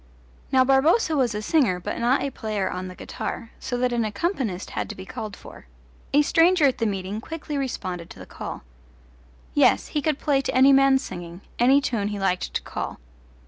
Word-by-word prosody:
Now 260 -1 +5
Barboza 310 - +3
was 250 -6 +1
a 210 - -3
singer 225 - +2
but 175 - -4
not 245 +4 +2
a 280 - -2
player 215 -5 -2
on 185 +1 -4
the 185 - -9
guitar, 225 +5 -6
so 245 - -3
that 250 0 0
an 235 -1 +1
accompanist 215 - -2
had - - -3
to 210 - -6
be 190 - -9
called 215 -2 -6
for. - - -13 0.4
A 290 +2 +5
stranger 330 +1 +4
at 265 - +2
the 230 - +1
meeting 195 +1 -3
quickly 310 +1 -6
responded 185 -11 -4
to - - -12
the - - -10
call. - - -7 0.9
Yes, 95 - +3
he 295 - -1
could 305 -1 0
play 280 -3 +1
to 270 - -3
any 265 +2 +7
man's 270 0 +5
singing 175 +1 -8 0.2
any 265 +4 +5
tune 230 -6 -1
he 205 0 -3
liked 190 -2 -1
to - - -1
call. - - -5
245 Hz, 200 wpm, -24 LUFS, 200-275 Hz, 0.9 s, any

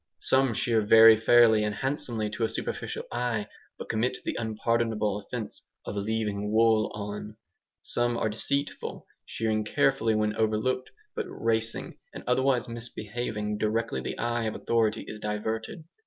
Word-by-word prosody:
Some 130 -3 +2
shear 115 -2 +2
very 110 +1 +8
fairly 110 -1 +5
and 105 -1 -1
handsomely 120 -3 -2
to 115 - -3
a 110 - +2
superficial - - -4
eye, 120 -3 -1 0.3
but - - -7
commit 125 +3 0
the - - -2
unpardonable 110 -2 0
offence 110 +2 -6 0.2
of - - -5
"leaving 105 0 -2
wool 110 -1 +3
on." 105 +1 -6 0.5
Some 120 0 0
are - - 0
deceitful, 140 +7 -2 0.2
shearing 110 -1 -1
carefully 115 0 +2
when 105 0 0
overlooked, 110 +4 0 0.3
but - - -3
"racing" 115 0 -2 0.2
and - - -7
otherwise 125 0 +2
misbehaving 110 -2 -4
directly 110 -10 0
the - - -5
eye 120 -1 -1
of 110 - -2
authority 115 -2 0
is 105 - -7
diverted. 110 +8 -3
110 Hz, 140 wpm, -28 LUFS, 105-120 Hz, 0.5 s, very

